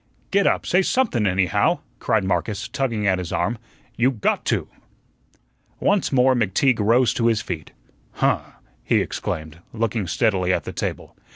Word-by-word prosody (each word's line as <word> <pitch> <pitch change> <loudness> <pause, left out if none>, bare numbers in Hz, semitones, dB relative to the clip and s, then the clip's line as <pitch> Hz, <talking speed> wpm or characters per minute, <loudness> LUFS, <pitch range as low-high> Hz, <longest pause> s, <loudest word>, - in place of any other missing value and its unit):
"Get 200 0 +3
up, - - +1
say 180 - +3
somethun, 190 - +1
anyhow," 95 -2 +2 0.2
cried 110 -3 +1
Marcus, 100 +3 -1
tugging 120 -4 -2
at 95 -2 +2
his 90 -2 -5
arm; 110 +6 -1 0.4
"you 125 +2 +4
GOT 120 -6 -1
to." - - 0 1.1
Once 200 -1 +1
more 130 -1 +4
McTeague 120 +2 +2
rose 115 +4 +3
to 115 - +1
his 115 -2 +1
feet. 80 -4 -5 0.4
"Huh!" - - +1 0.4
he - - +1
exclaimed, 80 +1 -4
looking 110 -3 -1
steadily 95 -3 +1
at - - 0
the - - -7
table. - - -5
110 Hz, 155 wpm, -22 LUFS, 95-125 Hz, 1.1 s, you